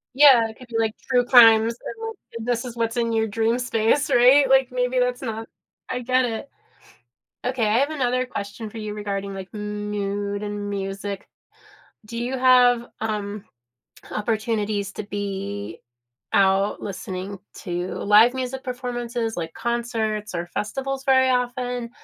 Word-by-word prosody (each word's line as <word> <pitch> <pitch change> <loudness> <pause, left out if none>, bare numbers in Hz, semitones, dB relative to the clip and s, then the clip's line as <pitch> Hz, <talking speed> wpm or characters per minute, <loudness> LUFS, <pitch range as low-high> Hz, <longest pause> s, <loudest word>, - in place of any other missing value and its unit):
Yeah, 265 -5 +7
it 220 - -12
could 255 - -13
be 230 -1 -3
like 220 -1 +1
True 250 -2 +1
Crimes, 230 -2 +7 0.6
and 225 - -7
this 240 0 0
is 240 - -7
what's 230 0 -1
in 230 -1 +1
your 220 -1 +1
dream 225 +3 0
space, 245 +4 +1
right? 260 +2 +6
Like, 265 -1 +5
maybe 250 0 0
that's 250 0 0
not 225 -3 -5 0.4
I 250 - -2
get 255 +1 +2
it. 230 +3 -4 1.0
Okay, 250 -4 0
I 220 +4 +3
have 280 - +2
another 255 -4 0
question 215 -1 -6
for 225 - -10
you 215 -1 -5
regarding 200 -1 -4
like 190 +2 -8
mood 205 -1 -3
and 205 0 -4
music. 195 0 -4 0.8
Do 230 +2 -8
you 245 +3 -2
have, 245 -2 +5
um, 210 -2 -3 0.7
opportunities 215 -2 -1
to - - -5
be 200 -2 -5 0.5
out 195 +1 +3
listening 190 0 -6 0.2
to 175 -1 -4
live 215 +4 +5
music 260 0 -4
performances 240 -2 -3
like 165 -1 -4
concerts 225 -3 -2
or 170 0 -2
festivals 270 +8 -3
very 260 -1 +4
often? 245 -1 -1
225 Hz, 145 wpm, -23 LUFS, 205-250 Hz, 1.0 s, Yeah